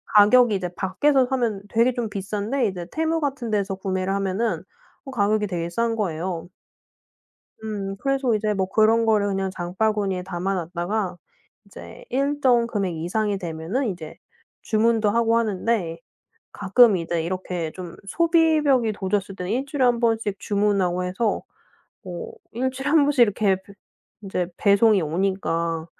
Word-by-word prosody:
가격이 215 +2 +6
이제 185 -2 -2
밖에서 260 +8 +2
사면 235 -6 -1
되게 235 +3 +3
좀 235 -3 -3
비싼데 210 +5 -2
이제 180 -3 -5
Temu 320 +1 0
같은 265 -5 -2
데서 200 -2 0
구매를 190 0 -2
하면은 200 +3 -1 0.4
어 270 - -7
가격이 210 -2 +1
되게 170 -2 -3
싼 230 +5 0
거예요. 175 -3 -3 1.2
음 200 -3 -4
그래서 270 -3 +1
이제 215 0 0
뭐 190 -1 0
그런 225 +3 +3
거를 210 -2 +3
그냥 195 -1 -1
장바구니에 190 +1 -1
담아 190 +1 -2
놨다가 180 +2 -2 0.5
이제 - - -12
일정 265 -3 +2
금액 200 -6 -2
이상이 200 +5 -1
되면은 175 - -3
이제 170 -5 -6 0.5
주문도 220 -1 +2
하고 230 +1 +2
하는데 205 -5 -1 0.5
가끔 205 +1 +4
이제 165 0 -2
이렇게 180 -2 -3
좀 180 -2 -9
소비벽이 310 - +3
도졌을 195 0 -2
때는 180 +1 -4
1 255 +4 0
주일에 275 -2 0
1 240 -1 +3
번씩 225 -4 0
주문하고 200 -3 +1
해서 190 +5 -1 0.6
뭐 180 -4 -7 0.2
1 260 +3 -1
주일에 270 +2 -3
1 305 -2 +5
번씩 280 -4 +4
이렇게 205 -3 +3
배 195 +1 -16 0.5
이제 185 -3 -2
배송이 200 -1 +4
오니까 165 -1 -1
205 Hz, 305 characters per minute, -23 LUFS, 185-235 Hz, 1.2 s, 가격이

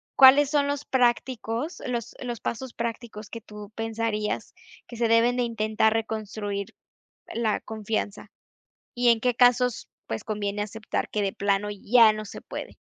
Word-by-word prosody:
¿cuáles 275 +1 +8
son 290 -2 +2
los 285 0 -2
prácticos 245 - 0
los 240 -2 -3
los 240 -2 -4
pasos 245 +1 -4
prácticos 230 -2 -5
que 230 - -7
tú 210 0 -11
pensarías 225 -1 -2 0.3
que 240 - -9
se 230 -1 +1
deben 230 +2 +4
de 250 - +1
intentar 220 -1 +1
reconstruir 215 -2 -3 0.7
la 225 -2 0
confianza? 215 -2 -4 0.7
Y, 245 0 +1
¿en 230 -1 +4
qué 250 0 +2
casos, 250 -1 +3 0.2
pues, 110 - -4
conviene 205 -1 -2
aceptar 215 +1 -3
que 210 - -1
de 195 -1 0
plano 200 +1 0
ya 220 +2 +5
no 215 0 -5
se - - -9
puede? - - -8
225 Hz, 155 wpm, -26 LUFS, 210-245 Hz, 0.7 s, cuáles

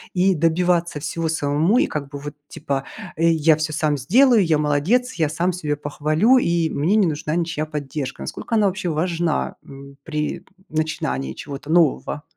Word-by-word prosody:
и 190 +2 +3
добиваться 170 0 +1
всего 165 +3 -3
самому? 155 +7 +1
И - - +4
как 145 -2 -5
бы 145 - -7
вот, 145 +1 -7
типа: 135 -1 -4 0.3
"Я 165 -1 +4
всё 155 0 -2
сам 150 -1 0
сделаю, 230 - +4
я 160 -3 +2
молодец, 155 - +1
я 160 - 0
сам 175 +4 0
себя 150 -4 -2
похвалю, 155 - +2
и 170 -6 0
мне 165 +9 +1
не 215 -3 +4
нужна 155 -1 -2
ничья 165 -3 -2
поддержка". 145 -2 -5
Насколько 230 - -4
она 215 -2 +3
вообще 190 -2 -1
важна, 165 - -1
м, 140 0 -13
при 150 -1 -3 0.3
начинании 70 - -2
чего-то 145 +1 -8
нового? 155 -2 +2
155 Hz, 165 wpm, -21 LUFS, 145-175 Hz, 0.3 s, И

